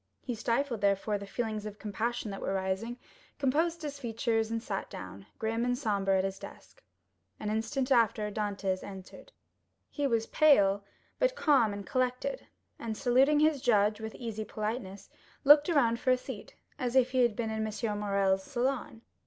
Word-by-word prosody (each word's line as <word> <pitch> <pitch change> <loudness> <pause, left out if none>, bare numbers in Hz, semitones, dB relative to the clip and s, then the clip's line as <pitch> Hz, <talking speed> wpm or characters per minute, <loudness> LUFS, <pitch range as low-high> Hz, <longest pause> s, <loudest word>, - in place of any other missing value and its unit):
He 250 - -3
stifled, 235 +1 -1
therefore, 200 +1 +1
the 200 - -8
feelings 215 -1 -3
of 205 -1 -8
compassion 220 +1 -3
that 195 - -6
were 195 - -1
rising, 190 +5 -2 0.4
composed 320 +5 +1
his 285 -2 -5
features, 225 -2 -1
and 230 0 -3
sat 195 -4 -4
down, 95 +1 -9
grim 225 +1 -1
and 245 0 +1
sombre, 200 -6 +1
at 190 - +1
his 195 0 -3
desk. - - -12 0.6
An 210 - -2
instant 255 +5 -1
after 220 -4 +3
Dantès 200 -3 -2
entered. 195 - -10 0.6
He 290 -2 0
was 230 -3 +1
pale, 205 -12 +4 0.4
but - - +2
calm 275 - +3
and 200 -1 -6
collected, 255 - -1 0.3
and 220 -2 -4
saluting 270 +4 +4
his 305 -3 +3
judge 210 -2 +3
with 220 0 -6
easy 225 -3 -4
politeness, 215 -2 -5 0.4
looked 295 +2 +7
round 240 -8 +3
for - - -1
a 255 - +5
seat, - - -9 0.2
as 250 -2 -2
if 255 -1 +4
he 260 - +1
had 235 -3 +3
been 225 -1 -2
in 220 0 -2
M. 210 -1 -3
Morrel's 195 -2 +1
salon. 245 -1 -2
225 Hz, 170 wpm, -30 LUFS, 205-255 Hz, 0.6 s, looked